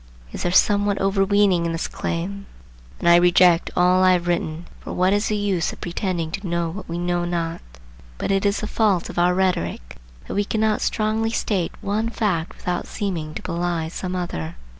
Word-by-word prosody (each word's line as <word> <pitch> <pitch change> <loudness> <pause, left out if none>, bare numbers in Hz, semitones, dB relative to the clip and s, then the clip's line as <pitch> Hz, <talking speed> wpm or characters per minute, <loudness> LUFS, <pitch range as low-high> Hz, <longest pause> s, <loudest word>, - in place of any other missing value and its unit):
Is - - -6
there 175 - 0
somewhat 205 +2 +3
overweening 195 -2 +2
in 165 - -2
this 165 - -2
claim? 195 +4 -4 0.5
Then 170 - +3
I - - +8
reject 175 0 +5
all 180 +1 +4
I 185 0 +6
have 175 -1 0
written, 170 -1 -1
for - - -7
what 185 +2 +2
is 205 +1 +1
the 215 - 0
use 195 -5 0
of - - -12
pretending 175 -2 -3
to 195 +2 -5
know 170 -1 -1
what 200 +1 -8
we 170 - -3
know 175 0 0
not? 170 -1 -2 0.6
But - - -2
it 195 0 +1
is 200 0 +1
the - - -3
fault 205 -6 +1
of - - -3
our 180 +1 +3
rhetoric 180 - -1 0.3
that - - -5
we 205 - +1
cannot 215 +1 0
strongly 220 +1 0
state 200 -6 -1
one 215 +3 -1
fact 185 -8 -1
without 180 -1 -3
seeming 170 -7 -4
to - - -6
belie 170 -2 -2
some 185 +2 -4
other. 85 - -4
180 Hz, 195 wpm, -22 LUFS, 170-200 Hz, 0.6 s, I